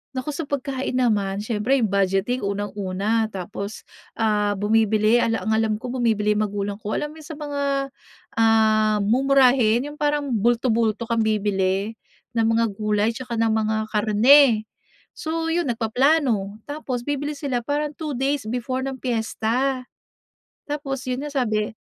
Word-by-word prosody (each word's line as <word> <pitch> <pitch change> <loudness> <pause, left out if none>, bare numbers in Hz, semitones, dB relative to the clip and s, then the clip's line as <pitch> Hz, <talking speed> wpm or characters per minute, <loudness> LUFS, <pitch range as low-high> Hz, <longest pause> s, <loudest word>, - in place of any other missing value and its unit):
Nako 260 +4 -3
sa 305 - -3
pagkain 265 -2 -2
naman, 205 -6 +1
siyempre 220 +5 0
yung 235 - +2
budgeting 200 +4 0
unang 200 +1 -3
una, 205 +3 -1
tapos, 200 +1 -6 0.3
ah, 210 -2 +1
bumibili 220 +2 +3
ala 225 -5 0
ang 220 - +1
alam 220 -1 +2
ko 250 +2 -6
bumibili 220 -4 +1
magulang 205 0 -2
ko, 210 - -2
alam 295 +1 -4
yung 315 - -12
sa 315 - -7
mga, 290 -2 -4 0.7
ah, 220 -1 +3
mumurahin 255 -1 +4
yung 295 +1 -9
parang 290 -2 0
bulto-bulto 230 0 +1
kang 230 -1 0
bibili 205 -1 0 0.4
ng 230 -1 +2
mga 230 0 +3
gulay 210 +2 0
tsaka 245 -2 -5
ng 225 -1 +2
mga 220 0 0 0.2
karne. 220 +3 +5 0.5
So 325 0 -3
yun, 340 -5 0
nagpaplano 230 -3 +1
tapos 270 -5 -4
bibili 290 0 -2
sila 265 -4 -2
parang 290 +4 -2
2 300 -2 -5
days 270 -3 -1
before 250 +2 -2
ng 270 0 -4
piyesta. 250 +2 -1 0.9
Tapos 275 -3 -3
yun 255 +3 -2
nga, 295 - -5
sabi 215 -5 0
230 Hz, 145 wpm, -23 LUFS, 215-270 Hz, 0.9 s, karne